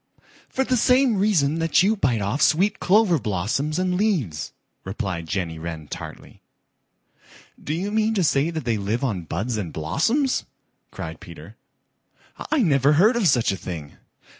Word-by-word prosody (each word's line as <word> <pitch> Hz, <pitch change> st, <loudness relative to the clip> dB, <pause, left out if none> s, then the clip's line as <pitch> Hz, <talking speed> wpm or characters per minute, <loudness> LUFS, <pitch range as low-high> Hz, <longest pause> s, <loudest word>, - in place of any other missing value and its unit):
"For 265 Hz, -, 0 dB
the 255 Hz, -1 st, 0 dB
same 250 Hz, -1 st, +3 dB
reason 165 Hz, -7 st, +2 dB
that 165 Hz, +2 st, +3 dB
you 210 Hz, +3 st, +3 dB
bite 120 Hz, -, 0 dB
off 110 Hz, +9 st, -2 dB
sweet 195 Hz, +7 st, +3 dB
clover 190 Hz, -4 st, +3 dB
blossoms 110 Hz, -, -2 dB
and 180 Hz, -1 st, 0 dB
leaves," 150 Hz, -, -1 dB, 0.3 s
replied 95 Hz, -4 st, -4 dB
Jenny 80 Hz, -2 st, -3 dB
Wren 80 Hz, -2 st, -6 dB
tartly. -, -, -9 dB, 1.2 s
"Do 150 Hz, -, -2 dB
you 195 Hz, +5 st, -3 dB
mean 220 Hz, +1 st, +1 dB
to 190 Hz, -, +2 dB
say 140 Hz, +1 st, +2 dB
that 160 Hz, -5 st, -5 dB
they 115 Hz, -3 st, 0 dB
live 105 Hz, +6 st, -2 dB
on 100 Hz, -10 st, -2 dB
buds 110 Hz, +9 st, -3 dB
and 90 Hz, -6 st, -4 dB
blossoms?" 225 Hz, -, 0 dB, 0.5 s
cried -, -, -7 dB
Peter. -, -, -12 dB, 1.0 s
"I 305 Hz, -5 st, +3 dB
never 140 Hz, -4 st, +3 dB
heard 205 Hz, +11 st, +4 dB
of 230 Hz, -6 st, +2 dB
such 120 Hz, -8 st, +3 dB
a -, -, -2 dB
thing." 85 Hz, -5 st, -7 dB
145 Hz, 160 wpm, -23 LUFS, -, 1.2 s, heard